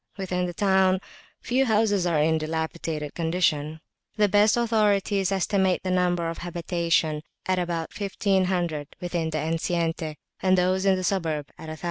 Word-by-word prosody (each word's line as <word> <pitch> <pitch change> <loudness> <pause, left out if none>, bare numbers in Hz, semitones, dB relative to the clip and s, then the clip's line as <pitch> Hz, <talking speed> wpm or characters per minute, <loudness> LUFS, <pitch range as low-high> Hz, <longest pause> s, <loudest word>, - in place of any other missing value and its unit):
Within 180 -2 -1
the 175 - -5
town 190 -1 +3 0.4
few 260 +2 +1
houses 210 -4 +2
are 170 -3 +1
in 160 +2 +3
a 160 - +1
dilapidated 160 -1 -3
condition. 160 -2 0 0.4
The 210 -1 +4
best 205 +3 +4
authorities 205 -4 +2
estimate 190 -1 +1
the 185 - -1
number 175 -2 +1
of 165 - -5
habitations 170 -3 0 0.2
at 185 -1 +1
about 170 -2 -2
1500 185 -6 -1
within 175 -3 -2
the 155 - -2
enceinte, 165 0 -1 0.3
and 185 0 +3
those 185 +2 +2
in 190 - +5
the 185 - -3
suburb 160 -6 -1
at 160 - -10
1000. 155 0 -7
180 Hz, 155 wpm, -25 LUFS, 160-190 Hz, 0.4 s, in